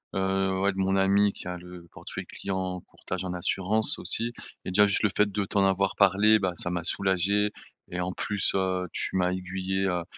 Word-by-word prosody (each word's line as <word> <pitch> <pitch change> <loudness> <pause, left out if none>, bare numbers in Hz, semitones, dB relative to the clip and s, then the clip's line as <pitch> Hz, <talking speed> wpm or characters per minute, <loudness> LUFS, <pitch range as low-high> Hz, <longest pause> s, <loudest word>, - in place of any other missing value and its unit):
heu, 95 0 0
ouais, 100 +1 +2
de - - -10
mon 95 0 +1
ami 100 +1 +4
qui - - -9
a 90 - -3
le 90 -1 -12
portefeuille - - -7
client, 95 -2 -4
courtage - - -6
en 90 - -3
assurance 95 +4 0
aussi 115 +1 0 0.3
et - - -3
déjà 105 +3 +6
juste 100 - +2
le 105 - +4
fait 105 0 +3
de 100 0 -1
t'en 100 0 +2
avoir 95 0 +1
parlé, 100 +2 +5
ben, 95 -3 -1
ça 90 - -1
m'a 85 -1 -2
soulagé 100 +3 +1 0.4
et 90 - -3
en 90 +1 -2
plus, 105 +1 0
heu, 95 -1 0
tu - - -3
m'as 90 -1 +2
aiguillé, 95 +1 -2
heu, 90 -2 -1
95 Hz, 205 wpm, -27 LUFS, 90-100 Hz, 0.4 s, déjà